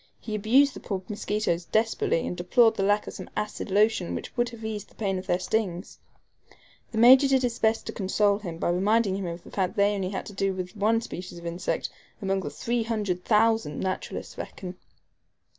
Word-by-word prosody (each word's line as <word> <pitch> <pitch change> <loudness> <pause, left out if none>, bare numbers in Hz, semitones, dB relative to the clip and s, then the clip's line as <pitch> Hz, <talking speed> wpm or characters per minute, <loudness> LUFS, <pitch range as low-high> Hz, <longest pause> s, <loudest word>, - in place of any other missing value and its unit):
He 215 - -6
abused 250 +7 +4
the - - -8
poor 190 -2 -4
mosquitoes 205 -4 -1
desperately, 220 -6 +1
and - - -3
deplored 225 +6 +4
the - - -2
lack 205 +2 +2
of - - -7
some - - -8
acid 210 0 -3
lotion 205 -2 +2
which - - -7
would 240 -1 +1
have 230 -2 -9
eased 215 -2 -5
the - - -24
pain 195 -3 -1
of 185 - -10
their 175 - +2
stings. 185 -1 -2 0.9
The 220 - -5
Major 255 +4 +8
did 265 -1 +3
his 240 -1 -1
best 220 0 +2
to - - -4
console 200 +1 +1
him 170 -6 -6
by 175 - 0
reminding 200 +2 +2
him 195 -2 -3
of 170 0 -6
the - - -13
fact 190 0 -1
that - - -21
they 200 +1 +4
had 200 -2 -2
only 190 +1 -3
to 205 - -10
do 195 0 0
with 185 +1 -5
one 220 +2 +2
species 180 -5 -7
of 170 - -10
insect, 170 +2 -2 0.3
among 195 -1 0
the - - -4
300,000 220 -4 0
naturalists 185 -1 -4
reckon. 180 -1 -7
205 Hz, 205 wpm, -27 LUFS, 185-225 Hz, 0.9 s, Major